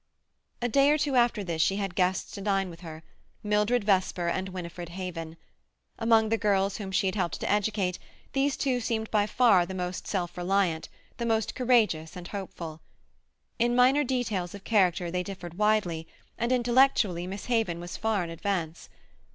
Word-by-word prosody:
A - - +2
day 275 +4 +4
or 300 - +4
two 285 -2 0
after 240 -4 +3
this 170 -3 -2
she 190 - +3
had 195 -2 -3
guests 185 +1 0
to 200 - -7
dine 195 -2 0
with 165 - -12
her—Mildred 210 +7 -2
Vesper 185 -3 +1
and 190 +2 -2
Winifred 175 -2 -7
Haven. 170 -3 -6 0.6
Among 225 -1 +4
the 225 0 +1
girls 200 -2 +1
whom 195 -3 -6
she 190 - +1
had 190 - +1
helped 180 -5 -2
to - - -3
educate, 205 -3 0 0.3
these 275 +1 +1
two 260 -3 0
seemed 225 -2 -2
by 210 -1 +2
far 215 -5 +4
the 190 +2 -6
most 180 0 -4
self 175 -4 -2
reliant, 180 -2 0 0.3
the 235 - -2
most 225 -1 0
courageous 220 -11 +2
and 180 -1 -8
hopeful. 170 -5 -7 0.8
In 240 +1 +2
minor 260 +4 +5
details 225 -9 -2
of 200 - -11
character 180 -5 +2
they 180 0 0
differed 180 -1 -8
widely, 195 -7 +1 0.3
and 235 +2 -1
intellectually 240 -8 +3
Miss 195 +1 -6
Haven 225 -8 0
was 175 +1 -7
far 220 -4 0
in 170 - -6
advance. 170 -2 -3
195 Hz, 175 wpm, -28 LUFS, 175-225 Hz, 0.8 s, minor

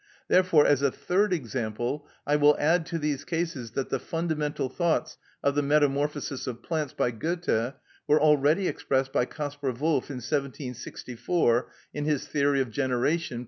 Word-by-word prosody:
Therefore, 180 -5 +5
as 145 -2 +4
a 140 - +3
third 195 +9 0
example, 125 -2 -2 0.2
I 145 - +2
will 150 0 +5
add 160 +2 +2
to 170 - -2
these 150 -3 -2
cases, 165 -9 -3
that 135 - -2
the 135 - -1
fundamental 155 -4 -2
thoughts 170 +4 -1 0.2
of 140 - +3
the 145 - +2
"Metamorphosis 145 -1 +1
of 120 -2 -5
Plants," 155 -4 -2
by 125 -4 0
Goethe, 135 -2 -1 0.3
were 150 - +5
already 150 +5 +4
expressed 135 0 -1
by 125 - +2
Kaspar 145 -2 -4
Wolff 145 +2 0
in 140 - -5
1764 125 0 -1 0.2
in 145 0 -3
his 150 -3 0
"Theory 140 -1 +2
of 130 -4 -3
Generation," 130 +4 0
p. - - -3
145 Hz, 160 wpm, -27 LUFS, 130-155 Hz, 0.3 s, Therefore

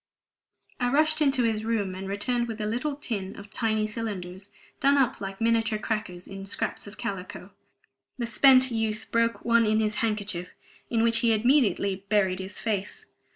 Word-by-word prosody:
I 245 -1 +1
rushed 310 +3 +3
into 270 -4 +3
his 220 -2 0
room, 215 -4 -1
and 190 +1 -6
returned 240 +4 -1
with 225 -1 -6
a 210 - -2
little 245 +7 -2
tin 205 -9 -4
of 200 0 -11
tiny 220 -3 0
cylinders 200 -4 -5 0.3
done 280 0 +4
up 265 -3 +1
like 195 0 -6
miniature 225 -1 +2
crackers 210 -5 -4
in 195 0 -8
scraps 200 - -3
of 205 - -11
calico; 185 -2 -6 0.7
the 240 - -2
spent 260 +2 +5
youth 220 -1 -1
broke 230 0 +1
one 230 -1 +4
in 215 +1 +3
his 215 -1 +1
handkerchief, 205 -5 -2 0.3
in 230 -1 +1
which 230 0 +3
he 230 -1 +3
immediately 210 -6 +2
buried 190 -3 +2
his 190 +2 -6
face. 205 -3 -3
220 Hz, 170 wpm, -27 LUFS, 200-235 Hz, 0.7 s, spent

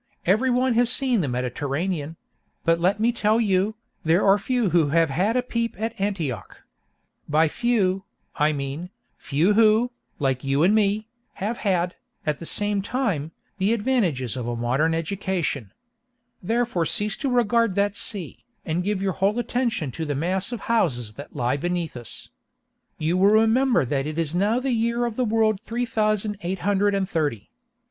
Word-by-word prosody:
Every 215 +9 +3
one 250 0 +2
has 235 +1 +3
seen 255 -6 +2
the 150 - -1
Mediterranean; 145 +6 -2 0.5
but 165 0 +3
let 190 +4 +2
me 230 +2 +3
tell 220 -1 +2
you, 205 -1 +1 0.3
there 165 +4 +3
are 200 +1 +5
few 235 -2 0
who 165 -3 +4
have 165 0 +2
had 200 - +1
a 250 - +1
peep 235 -2 -2
at 225 +1 -2
Antioch. 165 - -3 0.7
By 155 +2 +4
few, 195 -1 0 0.3
I 150 0 +2
mean, 145 +4 -4 0.3
few 160 +9 +1
who, 220 +3 +4 0.3
like 135 -2 0
you 135 +2 +1
and 190 +4 +5
me, 215 0 +2 0.3
have 215 +4 -3
had, 180 -3 0 0.3
at 150 -2 -1
the 165 - -6
same 205 -1 0
time, 195 - -2 0.3
the 195 +4 +2
advantages 200 - 0
of 125 -2 -4
a 120 - -2
modern 130 +8 +1
education. 165 - -2 0.7
Therefore 225 -5 0
cease 210 +1 -1
to 275 - -2
regard 235 -4 +2
that 200 0 +1
sea, 200 -5 -3 0.2
and 170 +2 -1
give 200 0 -1
your 190 -1 0
whole 195 +5 +1
attention 240 - -1
to 160 +7 -4
the 145 -1 -2
mass 185 - -1
of 235 -4 -5
houses 125 - 0
that 140 +6 -11
lie 125 +3 0
beneath 175 0 -2
us. 120 -2 -5 0.7
You 160 +3 0
will 195 +2 +5
remember 225 - +4
that 135 +2 -1
it 155 +1 -5
is 165 -2 0
now 205 +7 +2
the 265 +1 -1
year 235 +1 +1
of 235 -2 -3
the 255 - 0
world 215 -2 +2
three 240 +2 -2
thousand 215 -2 0
eight 185 +1 -2
hundred 205 0 +2
and 195 -1 0
thirty. 150 - -2
195 Hz, 175 wpm, -24 LUFS, 155-225 Hz, 0.7 s, are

